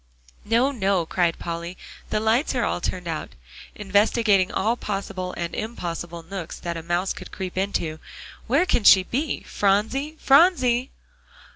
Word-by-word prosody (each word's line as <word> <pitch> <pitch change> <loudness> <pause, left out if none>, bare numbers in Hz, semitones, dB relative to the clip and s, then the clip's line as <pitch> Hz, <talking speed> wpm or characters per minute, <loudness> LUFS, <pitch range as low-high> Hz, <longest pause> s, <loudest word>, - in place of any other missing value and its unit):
"No, 235 +5 +3
no," 195 -8 +1
cried 170 0 0
Polly, 170 +1 -5 0.3
"the 215 - 0
lights 225 +6 +1
are 240 - +1
all 175 - -1
turned 180 -1 -3
out," 160 -2 -4 0.4
investigating 205 -1 +2
all 220 +5 +1
possible 195 -4 -4
and 170 -1 -3
impossible 175 -6 -5
nooks 175 -1 -7
that 170 -1 -4
a 165 - -5
mouse 175 +3 -1
could - - -10
creep 185 -2 -6
into. 180 -5 -2 0.5
"Where 280 +9 +3
can 240 - +1
she 190 -2 +8
be? 275 +10 -2
Phronsie 225 +10 0
Phronsie!" 270 -5 +4
195 Hz, 145 wpm, -24 LUFS, 175-235 Hz, 0.5 s, she